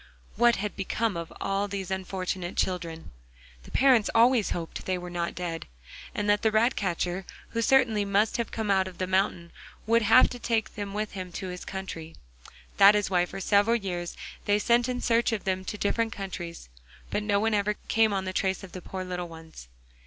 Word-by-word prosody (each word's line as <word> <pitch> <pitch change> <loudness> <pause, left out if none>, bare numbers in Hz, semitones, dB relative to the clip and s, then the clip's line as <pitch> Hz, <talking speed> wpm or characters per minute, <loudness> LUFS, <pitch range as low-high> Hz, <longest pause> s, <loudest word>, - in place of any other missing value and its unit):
What 240 +1 +5
had 210 +1 -3
become 210 +2 -1
of 170 -1 -5
all 195 +1 -1
these 195 -2 -5
unfortunate 185 -1 -3
children? 170 -3 -2 0.5
The - - -14
parents 255 -5 +4
always 230 -2 +5
hoped 165 -1 -5
they 185 -1 +1
were 180 0 -7
not 170 -1 -2
dead, 170 -2 -4 0.5
and 210 - -1
that 205 0 +3
the 220 - +3
rat 220 +4 +3
catcher, 180 -1 -1 0.3
who 230 - -2
certainly 230 -3 +3
must 200 +2 +1
have 235 - -2
come 220 -2 -1
out 190 -1 +3
of 185 - -10
the 185 - -1
mountain, 185 -2 0 0.3
would 230 +2 +4
have 225 +4 +6
taken 230 -3 -1
them 205 -2 -5
with 215 0 -2
him 185 -2 -6
to 190 - -5
his 180 0 -6
country. 165 -4 -7 0.6
That 200 +1 +8
is 205 -1 0
why 180 -1 +3
for 195 - -7
several 205 +4 +3
years 180 -5 -4 0.3
they 205 0 +3
sent 240 +3 +2
in 250 0 -2
search 235 +1 +2
of 220 -3 -2
them 190 -1 -1
to 210 - -4
different 225 +2 0
countries, 175 - -6 0.4
but 210 - 0
no 205 -1 +1
one 220 +1 +1
ever 210 0 +1
came 225 -1 +3
on 195 -1 -1
the 185 - -3
trace 190 0 0
of 190 - -10
the 185 - -8
poor 185 +1 -5
little 180 -1 -4
ones. 160 - -12
195 Hz, 200 wpm, -27 LUFS, 180-220 Hz, 0.6 s, That